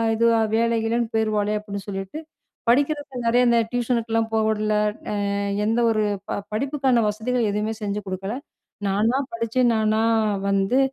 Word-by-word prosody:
இது 230 +1 +3 0.3
வேல, 230 0 +2
கீழேன்னு 230 0 0
போயிருவாளே! 215 -1 +1
அப்பிடின்னு 200 -1 -7
சொல்லிட்டு," 195 +7 -5 0.5
படிக்கிறதுக்கு 285 +1 +1
நிறைய 245 +2 +4
இந்த 235 0 +4
டியூஷனுக்குலாம் 230 -2 0
போக 220 - +3
விடல. 215 0 0 0.4
அ - - -1 0.5
எந்த 225 +2 +1
ஒரு 215 -1 +1 0.3
ப - - -2 0.2
படிப்புக்கான 265 -1 +1
வசதிகள் 225 +2 -1
எதுவுமே 210 +2 -1
செஞ்சு 205 0 -2
குடுக்கல. 190 +4 -4 0.5
நானா 220 +6 +2 0.2
படிச்சு, 230 +2 -2
நானா 220 0 +2 0.5
வந்து 195 +6 +2
225 Hz, 135 wpm, -23 LUFS, 210-240 Hz, 0.5 s, நிறைய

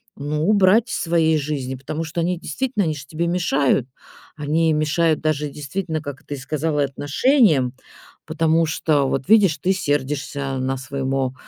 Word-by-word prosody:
ну, 150 +3 -2
убрать 210 +3 +4
в - - -4
своей 165 -2 +2
жизни, 140 -3 -3
потому 150 +5 -5
что 170 +2 -3
они 175 +1 -1
действительно, 210 - -2
они 155 -1 -1
же 140 -2 -9
тебе 165 +4 -3
мешают. 145 -7 +1 0.5
Они 160 +2 +1
мешают 155 +1 +1
даже 150 -1 -1
действительно, 155 +3 -4
как 145 +1 -8
ты 145 - -5
сказала, 150 +2 -1
отношениям, 145 - +2 0.5
потому 160 +1 +2
что, 150 -3 +1
вот, 135 +6 -2
видишь, 195 -8 +5
ты 185 - +1
сердишься 145 -3 -2
на 130 +1 -1
своемо 135 -1 -2
150 Hz, 150 wpm, -21 LUFS, 140-165 Hz, 0.5 s, видишь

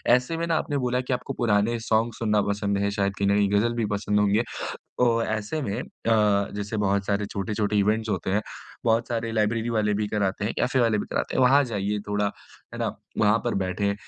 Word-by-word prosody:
ऐसे 125 +6 -1
में 165 - -1
ना 165 - +1
आपने 145 - -1
बोला 125 -1 0
कि 130 0 -2
आपको 130 +2 -3
पुराने 115 -1 +1
सॉन्ग 115 +1 +1
सुनना 105 -2 +1
पसंद 100 0 0
है, 100 0 0
शायद 100 -1 0
कहीं 100 - +1
न 100 - +3
कहीं 100 -1 +3
गजल 115 +3 +2
भी 115 -2 0
पसंद 105 0 0
होंगे। 105 +2 +3 0.6
तो 115 -2 +3
ऐसे 110 +7 -2
में 100 -6 -2 0.3
अ, 105 -3 +3
जैसे 105 +2 -4
बहुत 100 -1 +1
सारे 100 0 0
छोटे-छोटे 105 +1 -2
इवेंट्स 110 +2 +1
होते 95 -1 -2
हैं, 100 +2 +2 0.4
बहुत 115 0 +2
सारे 115 -1 -2
लाइब्रेरी 110 +1 0
वाले 105 -2 +1
भी 105 +1 0
कराते 100 -1 -1
हैं, 105 - -1
कैफे 130 +1 +2
वाले 115 -3 +3
भी - - -3
कराते - - -2
हैं 130 - +3
वहाँ 135 +3 +6
जाइए 105 -3 -2
थोड़ा, 105 0 +1 0.5
है - - -6
ना, - - 0 0.3
वहाँ 105 +1 +4
पर 120 - 0
बैठें। 100 +2 -1
105 Hz, 215 wpm, -25 LUFS, 100-115 Hz, 0.6 s, वहाँ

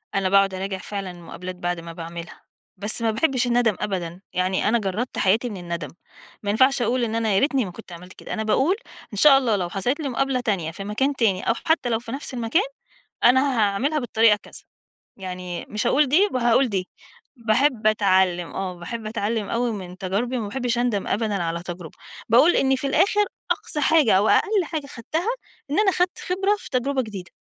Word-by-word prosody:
أنا 195 -1 +1
باقعد 195 0 +4
أراجع 190 +1 -3
فعلًا 195 0 -5
المقابلات 180 +1 -8
بعد 175 -1 -3
ما 165 0 -8
باعملها، 170 0 -8 0.4
بس 205 +4 -1
ما 225 -1 +2
باحبش 255 +1 +1
الندّم 240 -3 +2
أبدًا، 180 -3 -4
يعني 185 +2 0
أنا 235 +2 +3
جرّدت 210 +5 -3
حياتي 220 +5 +2
من 205 - -6
الندم، 170 -4 -5 0.5
ما 205 - -2
ينفعش 260 +5 +3
أقول 240 +2 +1
إن 225 -1 -1
أنا 225 -2 +1
يا - - +5
ريتني 275 -4 +1
ما 185 - -7
كنت 205 0 -13
عملت 180 +2 -11
كده، - - -8
أنا 220 - -2
باقول 265 - +2 0.4
إن - - -5
شاء 275 +5 +7
الله 245 -5 +1
لو 180 -3 -2
حصلت 200 - -1
لي 290 -3 -2
مقابلة 265 +1 0
تانية 195 -9 -1
في 195 +4 -8
مكان 250 +8 0
تاني 200 -7 +1
أو - - +5
حتّى 320 -6 +2
لو 225 -1 +1
في 230 -1 -9
نَفْس 270 0 -6
المكان، 240 - +1 0.6
أنا 260 +2 +4
هاعملها 220 +9 +1
بالطريقة 225 -4 +4
كذا، - - -12 0.6
يعني 180 -2 -6
مش 215 +3 -2
هاقول 290 +4 +4
دي 365 +10 +4
وهاقول 245 +1 +3
دي، 190 -4 -2 0.5
باحب 235 0 +1
أتعلِّم، 190 -5 +2
آه، 190 -1 -4
باحب 220 +6 -6
أتعلِّم 215 -1 -2
أوي 235 0 0
من 185 -3 -7
تجاربي 205 +7 -1
وما 215 -3 -3
باحبش 245 +1 -1
أندم 240 -5 0
أبدًا 210 -3 -1
على 170 0 -3
تجربة، 175 -2 -8 0.3
باقول 260 +10 +5
إنّي 265 0 +3
في 270 - -3
الآخر 405 +8 +3 0.3
أقصى 350 -3 -2
حاجة 310 -5 +4
أو 205 +3 +3
أقل 415 -3 +3
حاجة 305 -2 -4
خدْتها 310 - -4 0.4
إن 295 - 0
أنا 415 -2 +4
خدْت 360 0 0
خبرة 390 +3 0
في - - -11
تجربة 265 +1 0
جديدة. 200 -6 -8
220 Hz, 195 wpm, -23 LUFS, 190-260 Hz, 0.6 s, شاء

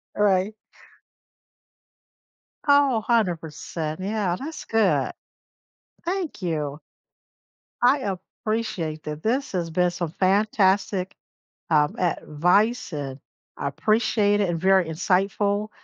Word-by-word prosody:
Alright. 200 0 +2 2.1
Oh, 280 -5 +4
100%. 170 -7 -1
Yeah, 195 -2 -1
that's 310 +4 -6
good. 225 -1 +2 0.9
Thank 355 - -3
you! 150 -4 -2 1.0
I 250 -5 +3 0.3
appreciate 185 -9 -2
that. 150 0 -6
This 260 +6 0
has 175 -3 -2
been 180 +2 +2
some 175 -2 -4
fantastic, 195 -1 +2 0.5
um, 150 -2 +3
advice, 180 +5 +1
and 140 -2 -5 0.4
I 140 - -2
appreciate 210 - +2
it 195 - +1
and 165 -1 -1
very 190 -1 +4
insightful, 195 +5 0
190 Hz, 95 wpm, -24 LUFS, 165-215 Hz, 2.1 s, Oh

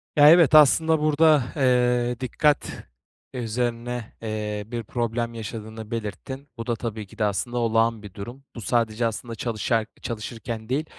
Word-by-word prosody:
Ya, 145 0 +8
evet. 165 -2 +7
Aslında 160 +2 +6
burada, 155 -1 +4
eee, 125 -3 +2
dikkat 145 +3 0 0.5
üzerine, 120 -1 -3
eee, 105 -1 -3
bir 120 0 -4
problem 115 +1 -2
yaşadığını 110 0 -7
belirttin. 115 +5 -5
Bu 115 - -6
da 120 - +1
tabii 110 -3 -5
ki - - -17
de, 110 - 0
aslında, 115 +4 -2
olağan 115 -1 +1
bir 100 -3 -10
durum. 120 +8 -9
Bu 115 - -7
sadece, 115 +1 0
aslında, 115 +1 -3
çalışar 115 0 -1 0.2
çalışırken 115 0 -6
değil, 145 +5 0
115 Hz, 145 wpm, -24 LUFS, 110-125 Hz, 0.5 s, Ya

